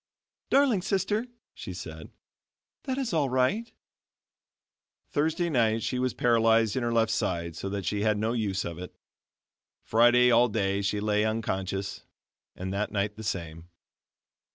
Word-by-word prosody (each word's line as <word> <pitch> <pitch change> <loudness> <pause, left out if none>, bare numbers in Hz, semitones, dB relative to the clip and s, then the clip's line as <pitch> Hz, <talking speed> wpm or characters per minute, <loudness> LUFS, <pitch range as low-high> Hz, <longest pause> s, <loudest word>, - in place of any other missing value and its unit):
"Darling 265 -8 +3
sister," 205 +5 -1 0.3
she - - -8
said, - - -8 0.8
"that 260 -2 -2
is 260 -8 -2
all 150 -4 +2
right." 130 - +1 1.4
Thursday 160 +4 0
night 115 -7 +1
she 125 - -1
was 125 -2 -1
paralyzed 115 -2 +3
in 130 - 0
her 120 0 -1
left 115 -1 +2
side 85 -6 -2
so 95 - -4
that 100 -1 -4
she 105 -1 -1
had 105 0 +2
no 110 +2 0
use 100 -5 -1
of 85 0 -6
it. 90 - -9 0.9
Friday 120 +2 +5
all 120 +1 +5
day 100 -2 0
she 100 +1 -1
lay 105 0 +1
unconscious, 95 -3 -2 0.5
and 95 +1 -5
that 100 +2 -2
night 105 0 -1
the 110 - -9
same. 85 -4 -5
110 Hz, 150 wpm, -28 LUFS, 100-130 Hz, 1.4 s, Friday